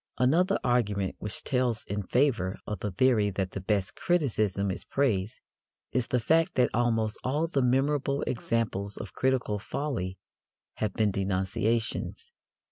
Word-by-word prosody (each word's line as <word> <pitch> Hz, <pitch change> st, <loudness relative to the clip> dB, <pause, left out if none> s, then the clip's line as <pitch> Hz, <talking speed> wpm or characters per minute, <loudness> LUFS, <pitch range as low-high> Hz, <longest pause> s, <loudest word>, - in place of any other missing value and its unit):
Another 175 Hz, +10 st, +3 dB
argument 105 Hz, -6 st, +1 dB
which 105 Hz, -, -3 dB
tells 125 Hz, -4 st, 0 dB
in 105 Hz, +1 st, -3 dB
favour 110 Hz, -4 st, +1 dB
of 105 Hz, -3 st, -4 dB
the 105 Hz, -, -2 dB
theory 105 Hz, +1 st, +3 dB
that 95 Hz, -1 st, -2 dB
the 100 Hz, -, -5 dB
best 100 Hz, -1 st, 0 dB
criticism 110 Hz, -, +1 dB
is -, -, -5 dB
praise 110 Hz, -8 st, 0 dB, 0.5 s
is 125 Hz, -2 st, 0 dB
the 125 Hz, -, +1 dB
fact 165 Hz, -, +2 dB
that 125 Hz, -2 st, +3 dB
almost 115 Hz, -2 st, +1 dB
all 145 Hz, +5 st, +1 dB
the 150 Hz, -5 st, 0 dB
memorable 140 Hz, +2 st, +1 dB
examples 110 Hz, -4 st, -1 dB
of -, -, -7 dB
critical 130 Hz, -5 st, 0 dB
folly 100 Hz, -7 st, -3 dB, 0.6 s
have 110 Hz, -2 st, -1 dB
been 105 Hz, -2 st, +2 dB
denunciations. 100 Hz, -, -1 dB
115 Hz, 140 wpm, -28 LUFS, 100-130 Hz, 0.6 s, Another